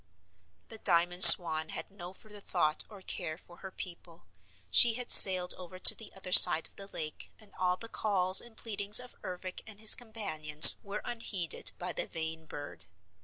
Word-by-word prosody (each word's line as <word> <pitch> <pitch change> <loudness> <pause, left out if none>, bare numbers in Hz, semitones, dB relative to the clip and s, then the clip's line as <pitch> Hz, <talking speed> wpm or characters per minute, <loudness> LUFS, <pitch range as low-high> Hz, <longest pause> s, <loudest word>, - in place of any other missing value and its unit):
The 225 - -11
Diamond 175 -1 -2
Swan 160 -3 +7
had - - -10
no 180 -2 -13
further 210 +2 -16
thought 160 -6 -6
or 200 -3 -18
care 160 -5 -9
for 175 -1 -22
her 190 - -14
people. 175 -3 -14 0.5
She 230 - +3
had 250 0 -6
sailed 185 -2 +4
over 185 0 -15
to - - +5
the 225 - -16
other 185 -1 -11
side 160 -2 +4
of - - -16
the 195 - -10
lake 155 -5 -11
and 215 -2 -19
all 180 0 -5
the 230 - -11
calls 190 -4 -1
and 235 -2 -17
pleadings 210 -1 0
of 250 0 -16
Ervic 185 0 -12
and 210 -2 -14
his 220 0 +3
companions 195 - +3
were 200 +1 -12
unheeded 200 -7 -6
by - - -10
the - - -6
vain 160 0 -10
bird. 145 - -14
185 Hz, 180 wpm, -26 LUFS, 170-210 Hz, 0.5 s, Swan